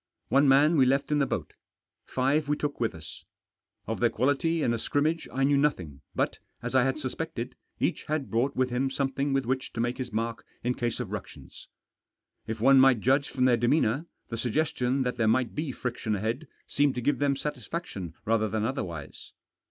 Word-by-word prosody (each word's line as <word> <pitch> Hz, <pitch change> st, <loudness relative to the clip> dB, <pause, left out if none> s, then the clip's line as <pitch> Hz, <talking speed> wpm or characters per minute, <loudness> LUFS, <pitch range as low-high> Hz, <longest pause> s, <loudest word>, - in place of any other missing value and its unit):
One 140 Hz, +1 st, +4 dB
man 145 Hz, +4 st, +5 dB
we 130 Hz, -2 st, +5 dB
left 135 Hz, +3 st, +1 dB
in 150 Hz, -, +3 dB
the 140 Hz, -, +2 dB
boat; -, -, -3 dB, 0.5 s
five 140 Hz, +4 st, +1 dB
we 150 Hz, -, +2 dB
took 145 Hz, -1 st, -3 dB
with 115 Hz, -6 st, 0 dB
us. 80 Hz, -2 st, -10 dB, 0.6 s
Of 115 Hz, -, -3 dB
their 120 Hz, -, +4 dB
quality 145 Hz, +7 st, +1 dB
in 120 Hz, -, +2 dB
a 115 Hz, -, -2 dB
scrimmage 155 Hz, +7 st, 0 dB
I 135 Hz, +1 st, 0 dB
knew 140 Hz, +1 st, +4 dB
nothing; 90 Hz, -, -1 dB
but, -, -, 0 dB, 0.2 s
as 120 Hz, +1 st, -5 dB
I 130 Hz, -1 st, +4 dB
had 135 Hz, +2 st, 0 dB
suspected, 130 Hz, -3 st, -4 dB, 0.2 s
each -, -, -1 dB
had 150 Hz, -3 st, -2 dB
brought 125 Hz, +5 st, +1 dB
with 130 Hz, -1 st, +1 dB
him 130 Hz, +2 st, +1 dB
something 135 Hz, +1 st, -1 dB
with 135 Hz, -2 st, +1 dB
which 130 Hz, +2 st, -2 dB
to -, -, -5 dB
make 120 Hz, +2 st, -1 dB
his 125 Hz, -2 st, -4 dB
mark 115 Hz, 0 st, -2 dB, 0.2 s
in 125 Hz, +1 st, +1 dB
case 120 Hz, -1 st, -2 dB
of 115 Hz, -6 st, -4 dB
ructions. 105 Hz, -2 st, -8 dB, 0.8 s
If 110 Hz, 0 st, -4 dB
one 135 Hz, +4 st, +6 dB
might 130 Hz, -4 st, +5 dB
judge 135 Hz, +4 st, +2 dB
from 130 Hz, -1 st, +1 dB
their 125 Hz, -2 st, +5 dB
demeanour 125 Hz, +4 st, +2 dB, 0.2 s
the 115 Hz, -, -4 dB
suggestion 130 Hz, +1 st, 0 dB
that 125 Hz, -1 st, -2 dB
there 110 Hz, -2 st, +2 dB
might 120 Hz, +2 st, +2 dB
be 150 Hz, -2 st, -2 dB
friction 120 Hz, -4 st, -3 dB
ahead 115 Hz, +9 st, -2 dB, 0.2 s
seemed 145 Hz, -1 st, +1 dB
to 125 Hz, -, -2 dB
give 140 Hz, +2 st, +1 dB
them 140 Hz, -1 st, +2 dB
satisfaction 140 Hz, -, -5 dB
rather 110 Hz, -1 st, +2 dB
than 110 Hz, +1 st, -1 dB
otherwise. 85 Hz, -, -5 dB
130 Hz, 200 wpm, -28 LUFS, 115-140 Hz, 0.8 s, one